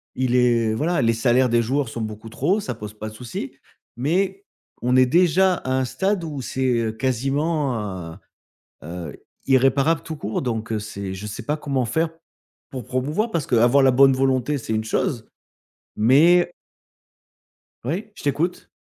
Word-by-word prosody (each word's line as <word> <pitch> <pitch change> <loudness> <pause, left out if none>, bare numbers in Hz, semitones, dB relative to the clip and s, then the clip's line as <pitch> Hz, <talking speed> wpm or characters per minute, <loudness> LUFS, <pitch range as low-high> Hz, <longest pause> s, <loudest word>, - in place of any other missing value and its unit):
Il 125 -1 0
est 120 -3 +3
voilà, 165 +8 0
les 115 0 +3
salaires 120 +2 +2
des 120 0 +3
joueurs 130 +2 -1
sont 115 - -5
beaucoup 110 0 -6
trop 160 - 0
ça 130 - -4
pose 105 -1 -8
pas 110 0 -7
de - - -13
souci, 115 +1 -6 0.4
mais 190 +8 0 0.4
on 125 +1 +1
est 130 - +6
déjà 180 +6 +3
à 130 - -5
un 130 0 +1
stade 190 +7 -1
où 150 -4 -5
c'est, 130 +1 -3 0.2
heu, 110 -1 -1
quasiment 135 +3 0
hein, 95 -5 -6 0.7
heu, 85 -2 -7 0.3
irréparable 135 +4 +3
tout 160 - -6
court 110 -6 -3
donc 115 -3 -3
heu, 110 - 0
c'est 100 -2 -6
je 95 +2 -7
sais 105 - -6
pas 150 - -1
comment 140 -4 -1
faire 160 +6 0 0.6
pour 130 -3 -6
promouvoir, 150 - -1
parce 165 -8 -2
que - - 0
avoir 120 +4 +5
la 135 -1 +5
bonne 135 +2 +6
volonté, 130 +2 +1
c'est 115 - -5
une 110 0 -1
chose, 115 +1 -2 0.7
mais 165 +11 +5 1.3
oui, 175 - -3
je - - -12
t'écoute. 155 +5 -1
130 Hz, 170 wpm, -22 LUFS, 115-150 Hz, 1.3 s, est